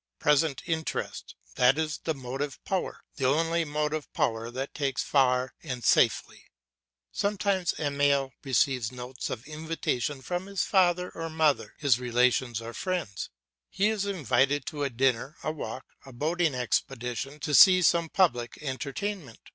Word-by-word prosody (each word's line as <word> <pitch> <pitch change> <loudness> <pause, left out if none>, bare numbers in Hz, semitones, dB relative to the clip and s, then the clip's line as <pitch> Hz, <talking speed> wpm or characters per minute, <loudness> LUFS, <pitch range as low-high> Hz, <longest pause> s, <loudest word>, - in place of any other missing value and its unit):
Present 150 -1 +2
interest, 160 -2 -3 0.2
that 125 +3 +5
is 155 -2 -2
the 160 - 0
motive 135 +2 -4
power, 190 -1 -2 0.2
the 135 -3 +1
only 165 +4 +2
motive 150 0 -2
power 115 0 0
that 130 +3 -5
takes 140 -3 -1
us - - -11
far 130 -2 +2
and 125 -2 -5
safely. - - +2 0.7
Sometimes 200 -3 0
Emile 140 -2 +1
receives 130 -3 +1
notes 125 0 -6
of 115 0 -5
invitation 150 -4 -3
from 180 +6 -3
his 200 -1 -1
father 180 -2 +2
or 165 0 -5
mother, 155 -2 +1
his 140 -5 +3
relations 125 -1 +1
or 115 +1 -7
friends; 170 - -3 0.4
he 205 +2 +1
is 205 -2 -1
invited 140 -6 +1
to 150 - -5
a 140 - 0
dinner, 130 +2 0
a 155 - -1
walk, 130 -5 -6 0.2
a 135 - -12
boating 155 +4 0
expedition, 125 +2 -2
to 150 +1 -3
see 185 +4 +8
some 170 -1 +3
public 125 -12 +1
entertainment. 145 - -4
145 Hz, 145 wpm, -28 LUFS, 125-165 Hz, 0.7 s, see